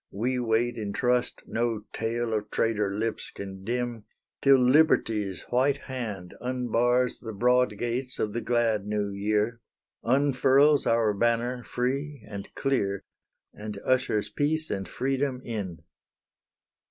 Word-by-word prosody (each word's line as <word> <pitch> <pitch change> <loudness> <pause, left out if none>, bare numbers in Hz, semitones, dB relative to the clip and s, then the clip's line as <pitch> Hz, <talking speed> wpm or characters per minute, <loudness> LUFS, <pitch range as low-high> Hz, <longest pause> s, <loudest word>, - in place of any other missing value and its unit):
we 125 +5 -1
wait 120 0 +1
in 105 -2 -3
trust 125 +3 0
No 115 -2 -1
tale 115 0 -1
of 105 -1 -2
traitor 105 -3 +1
lips 115 +1 -2
can 95 -1 -8
dim, 120 0 -2 0.4
Till 140 -1 +7
Liberty's 125 - +3
white 135 +3 +3
hand 110 -9 -5
unbars 125 0 +1
The 110 -2 -7
broad 125 +1 +2
gates 125 +3 -2
of 105 -1 -1
the 120 - -2
glad 115 -4 +1
New 105 -1 -1
Year, 105 +3 0 0.4
Unfurls 140 +3 +4
our 115 -2 +3
banner 120 +3 0
free 135 +1 -3
and 100 -2 -7
clear, 100 -8 0 0.5
And 105 -1 -7
ushers 125 -5 +1
Peace 155 +7 -1
and 95 -1 -3
Freedom 135 0 -1
in! 95 -8 -5
120 Hz, 130 wpm, -27 LUFS, 105-125 Hz, 0.5 s, Till